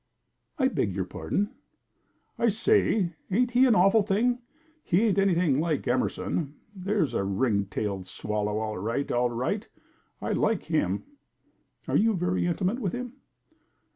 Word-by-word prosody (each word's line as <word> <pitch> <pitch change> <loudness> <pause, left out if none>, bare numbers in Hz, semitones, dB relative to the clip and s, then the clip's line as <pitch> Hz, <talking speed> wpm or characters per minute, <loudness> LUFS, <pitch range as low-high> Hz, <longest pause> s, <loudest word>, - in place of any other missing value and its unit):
"I 260 -4 +3
beg 100 - -1
your 95 -2 -1
pardon." 205 - -2 0.9
"I 235 - +3
say, 220 - +2 0.2
ain't 245 +6 +2
he 250 +2 +5
an 235 - +4
awful 195 +5 +5
thing? 220 +5 +1 0.4
He 180 +5 +2
ain't 205 -3 +2
anything 175 -7 +3
like 155 -2 -1
Emerson. 140 +4 -1 0.2
There's 185 - 0
a 100 - 0
ring 100 +1 +1
tailed 100 -1 -3
swallow, 105 +2 -2
all 110 -2 -3
right, 115 +8 -2
all 120 0 +2
right! 130 - -2 0.5
I - - -3
like 220 -3 +1
him." 105 - 0 0.8
"Are - - 0
you 220 0 +3
very 180 0 0
intimate 185 +7 0
with 200 -8 -2
him?" 250 0 -5
175 Hz, 145 wpm, -27 LUFS, -, 0.9 s, he